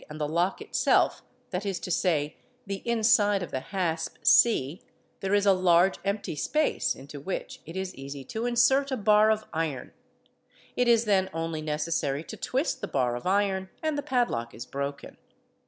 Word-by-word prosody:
and 150 +1 -8
the 150 - -1
lock 170 +5 0
itself, - - +2 0.3
that 180 0 -2
is 195 -3 -2
to 180 - -5
say, 155 -5 0 0.3
the 195 -1 -5
inside 220 -4 +3
of - - -7
the 130 - -2
hasp 165 0 -3
c, 230 - +4 0.4
there 195 +1 0
is 205 0 +2
a 200 - +6
large 185 0 +3
empty 200 -4 -2
space 300 - 0
into 140 +2 -10
which 185 +7 -5
it 165 - -8
is 190 -1 -3
easy 135 0 -8
to 220 - -4
insert 265 +3 +3
a 260 - -1
bar 215 0 +4
of 215 0 +1
iron; 160 -6 -3 0.8
it 245 - +1
is 235 -1 +4
then 190 -3 +2
only 165 -1 -3
necessary 150 -1 -1
to 220 - -8
twist 260 +5 -2
the - - -3
bar 125 -3 0
of 120 - -5
iron 190 -1 +1
and 310 -1 0
the 290 - -1
padlock 240 - -1
is 120 - -7
broken. 140 +1 -5
190 Hz, 180 wpm, -27 LUFS, 150-220 Hz, 0.8 s, a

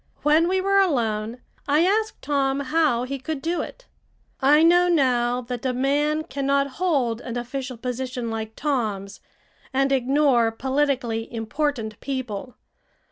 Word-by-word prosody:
When 310 +3 +4
we 375 +1 +1
were 395 +1 +3
alone, 235 - 0 0.3
I 295 +2 +3
asked 430 +3 0
Tom 275 -1 +1
how 285 -4 +1
he 275 +2 -4
could 305 +2 -4
do 335 +5 -1
it. - - -9 0.6
I 295 +4 +5
know 350 +2 +5
now 250 -7 +2
that 245 -1 -6
a 260 -1 0
man 295 +4 +1
cannot 280 -2 0 0.2
hold 260 -10 +1
an 245 -1 -5
official 255 +1 -5
position 250 0 -4
like 220 0 -5
Tom's 215 -9 -2 0.5
and 270 +1 +1
ignore 265 -3 +3
politically 260 -2 -1
important 225 -1 -2
people. 255 -4 -5
270 Hz, 135 wpm, -24 LUFS, 240-295 Hz, 0.6 s, I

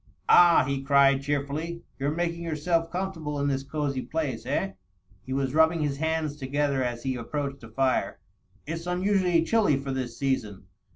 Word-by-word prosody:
"Ah," 175 -1 +7
he 140 -1 -1
cried 140 0 +4
cheerfully, 145 +4 -3 0.2
"you're 140 +1 0
making 170 +2 -2
yourself 165 +1 0
comfortable 165 -6 -3
in 140 - 0
this 135 -1 0
cosey 140 -1 -2
place, 135 -2 -3
eh 95 - 0 0.3
?" 95 0 -33
He - - -6
was 135 -1 -1
rubbing 160 +1 +4
his 140 -2 -1
hands 160 -1 -1
together 140 -1 0
as 120 -1 -3
he 130 -1 -1
approached 140 +3 -4
the 115 - -11
fire. 130 +3 0 0.5
"It's 165 +3 -5
unusually 180 -2 +2
chilly 205 -7 +3
for 135 0 -4
this 130 -3 -4
season. 115 -8 -2
145 Hz, 170 wpm, -27 LUFS, 135-165 Hz, 0.5 s, Ah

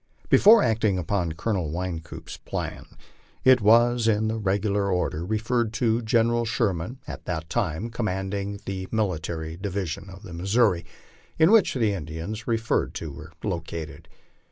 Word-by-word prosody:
Before 220 +2 +7
acting 110 -4 +2
upon 90 -2 -1
Colonel 90 -1 -1
Wynkoop's 85 0 -5
plan, - - -5 0.6
it 130 -2 +6
was 120 +2 +4
in 110 0 +2
the 110 0 -2
regular 100 0 0
order 90 -3 -1
referred 110 +3 0
to 115 0 +1
General 115 +1 +2
Sherman, 110 -1 -1
at - - -8
that 80 -3 -4
time 85 +9 -1
commanding 100 -2 -3
the 95 -1 -4
Military 85 -6 -2
Di 100 +2 -4
vision 95 -1 -4
of 95 0 -12
the 90 - -9
Missouri, 95 0 +2 0.5
in 160 +4 +5
which 220 -9 +5
the 110 -5 +2
Indians 85 +6 -5
referred 115 -1 0
to 80 -2 -5
were 80 +3 -10
located. 85 -4 -5
100 Hz, 145 wpm, -25 LUFS, 85-115 Hz, 0.6 s, Before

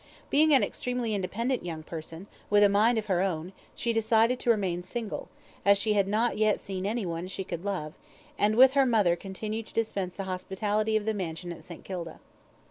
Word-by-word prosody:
Being 310 +2 +5
an 265 -6 +6
extremely 245 +1 -2
independent 230 +6 -1
young 165 -3 -5
person, 165 +2 -8 0.2
with 205 0 +5
a 205 - +6
mind 220 +4 +3
of 215 - -1
her 185 -4 +1
own, 180 -1 -2 0.2
she 235 0 -1
decided 225 +2 +3
to - - -2
remain 190 -6 +1
single, 210 +4 -5 0.4
as 200 0 +5
she 215 +2 +1
had 200 -2 +2
not 215 +2 +1
yet 215 -1 +3
seen 190 0 -4
anyone 185 -6 -2
she 190 +1 -4
could 170 -1 -6
love, 185 -7 -3 0.4
and 210 +1 +2
with 260 +2 +7
her 275 -2 +4
mother 210 -8 +3
continued 210 +4 -5
to - - -16
dispense 200 -5 -1
the 195 - -4
hospitality 205 +3 -1
of 210 - -4
the 220 - +1
mansion 175 -3 -4
at - - -13
St. 170 -2 -10
Kilda. 170 -4 -6
205 Hz, 200 wpm, -28 LUFS, 185-225 Hz, 0.4 s, with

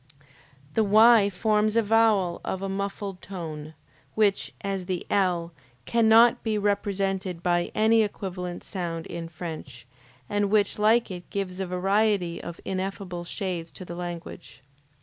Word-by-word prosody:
The 220 - +3
Y 215 0 +6
forms 215 +2 +1
a 230 - +4
vowel 210 -5 +3
of 190 0 -3
a - - -1
muffled 195 -1 -4
tone, 160 -5 -7 0.4
which, 210 -2 +2
as 195 -2 -3
the 185 -2 -3
L, 175 -4 +1 0.3
cannot 230 +1 +5
be 220 -2 -1
represented 195 -3 -1
by 175 -1 +1
any 220 +1 +4
equivalent 180 -4 -4
sound 170 -4 -4
in 165 -1 -6
French, 155 -8 -8 0.4
and 205 +3 0
which 210 0 +2
like 220 +1 +3
it 180 -1 -8
gives 190 -2 -4
a 190 - -2
variety 195 -1 +1
of 170 -1 -8
ineffable 190 -2 -4
shades 175 -3 -4
to 185 - -9
the 175 - -7
language. 175 -5 -8
195 Hz, 140 wpm, -26 LUFS, 175-210 Hz, 0.4 s, Y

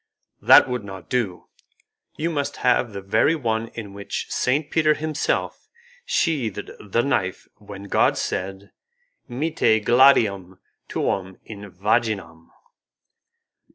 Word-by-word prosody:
"That - - +7
would 125 -3 -3
not 95 -2 -10
do, 110 -8 -2 0.7
you 165 +2 -1
must 145 -3 -3
have 125 -1 +3
the 100 -1 -7
very 110 +11 +2
one 115 -6 -2
in 105 -4 -7
which 100 0 -5
Saint 145 +4 0
Peter 155 -1 +3
himself 155 -1 -2 0.4
sheathed 140 - -1
the 105 +3 -1
knife 95 -9 -1
when 100 -1 -11
God 100 - +2
said, 95 +2 -4 0.6
'Mitte 120 -5 +1
gladium 105 -8 +4 0.3
tuum 95 -1 -2
in 105 -2 -9
vaginam'. 95 -4 -2
110 Hz, 115 wpm, -23 LUFS, 100-135 Hz, 0.7 s, That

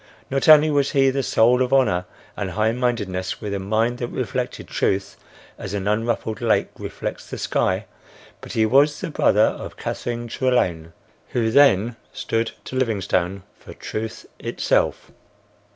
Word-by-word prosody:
Not 135 +3 +1
only 155 0 +8
was 140 -1 +1
he 135 -1 +4
the 135 +1 -1
soul 125 0 +3
of 125 - 0
honor 125 -10 +3 0.3
and 100 - -3
high 110 +4 +1
mindedness, 105 -7 -2
with 105 -2 -4
a 100 - -2
mind 110 +5 0
that 120 - -2
reflected 125 0 -4
truth 95 0 -1 0.4
as 100 - -5
an 100 -1 -3
unruffled 110 0 -1
lake - - +2
reflects - - -6
the - - -5
sky, - - 0 0.6
but - - -9
he 110 - +3
was 140 +6 +4
the 185 -5 -5
brother 105 -7 +3
of - - -2
Catherine 120 0 -4
Trelane, 90 -11 0 0.4
who 115 -3 +1
then 120 -4 +4 0.2
stood 115 0 -1
to - - -8
Livingstone 100 -6 0 0.2
for - - -12
Truth 110 +1 -6
itself. - - 0
115 Hz, 150 wpm, -22 LUFS, 100-130 Hz, 0.6 s, only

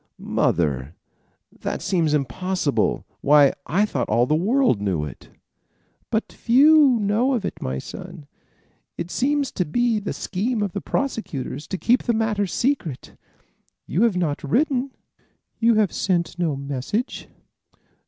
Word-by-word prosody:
"Mother, 75 -2 0 0.6
that - - -3
seems 165 -5 +1
impossible. 150 +4 -1 0.2
Why, 145 -1 +5
I 195 +7 +2
thought 135 - -3
all 115 +3 +3
the 150 - 0
world 200 - +2
knew 90 -7 -1
it." 75 - -11 0.8
"But 220 0 -2
few 275 +1 +5
know 215 +6 +1
of 225 - -2
it, - - -5
my 65 0 -3
son. 145 - -9 0.7
It 175 - -5
seems 285 +1 0
to 180 - -1
be 230 +7 +1
the 205 - -4
scheme 210 +3 -2
of 200 - -2
the 200 - -3
prosecution 225 - -3
to 190 - -2
keep 245 +6 +2
the 235 - 0
matter 215 -2 0
secret. 210 - -2 0.7
You 180 - -1
have 230 -5 +3
not 155 -5 -1
written. 265 - +1 0.7
You 230 0 +4
have 215 -3 +2
sent 175 -2 -1
no 165 -5 0
message?" 140 - -4
195 Hz, 140 wpm, -23 LUFS, 145-235 Hz, 0.8 s, Why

